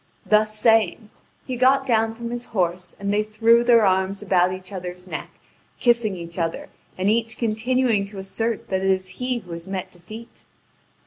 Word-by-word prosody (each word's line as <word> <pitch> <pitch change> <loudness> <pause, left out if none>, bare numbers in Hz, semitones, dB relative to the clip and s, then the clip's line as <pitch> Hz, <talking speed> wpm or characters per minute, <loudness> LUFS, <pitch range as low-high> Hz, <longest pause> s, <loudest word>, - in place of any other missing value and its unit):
Thus 215 0 +2
saying, 220 -1 +2 0.3
he 255 - -4
got 265 +2 +3
down 225 -2 +1
from 235 0 -6
his 240 0 -4
horse, 180 -3 -2
and 200 0 -1
they 210 - +3
threw 225 +2 +3
their 235 -3 +5
arms 190 +2 +1
about 185 -2 +3
each 185 +1 -8
other's 180 -1 -7
neck, 185 - -6 0.5
kissing 235 -5 +3
each 170 +1 -7
other, 165 -1 -3 0.3
and 185 +1 -1
each 225 +2 +1
continuing 230 -1 +1
to 200 0 -11
assert 215 +4 -3
that 190 -1 0
it 195 - +1
is 185 -1 +1
he 250 0 0
who 185 -7 -10
has 170 +1 -7
met 190 -1 -5
defeat. 215 +7 -12
210 Hz, 180 wpm, -23 LUFS, 185-230 Hz, 0.5 s, their